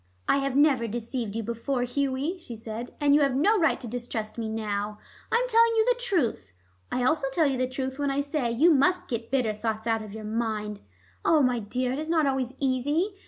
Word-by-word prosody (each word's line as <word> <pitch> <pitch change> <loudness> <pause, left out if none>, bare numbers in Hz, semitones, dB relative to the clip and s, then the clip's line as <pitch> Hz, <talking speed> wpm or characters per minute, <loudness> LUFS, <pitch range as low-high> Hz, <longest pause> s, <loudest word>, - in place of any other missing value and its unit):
"I - - +4
have 275 -1 -1
never 275 -5 +4
deceived 230 -1 -4
you 230 - -2
before, 235 +3 -2
Hughie," 280 +6 -1
she 245 -9 -8
said, 225 +2 -6
"and 290 -1 +4
you 295 - +5
have 275 -3 +2
no 405 +10 +3
right 320 - +2
to 245 - -7
distrust 230 -2 -4
me 225 -2 -3
now. 210 -1 -3 0.3
I - - +2
am - - +2
telling 460 -1 +5
you 440 -1 +4
the - - +2
truth. 350 - -1 0.4
I 250 - 0
also 275 +2 +2
tell 320 +3 +2
you 270 -3 0
the 255 0 0
truth 265 +1 -4
when 285 -1 +1
I 275 +1 0
say 285 -3 -1
you 300 +9 +5
must 340 +6 +3
get 230 -1 -4
bitter 250 -5 +1
thoughts 220 +1 -3
out 225 -1 +1
of 215 -1 -9
your 220 - -7
mind. 215 -2 -2 0.4
Ah, 315 -2 +4
my 250 -3 +2
dear, 250 +4 -2
it 265 - -2
is 310 +1 -5
not 320 -2 +3
always 265 -2 -1
easy. 290 - 0
255 Hz, 225 wpm, -27 LUFS, 230-295 Hz, 0.4 s, you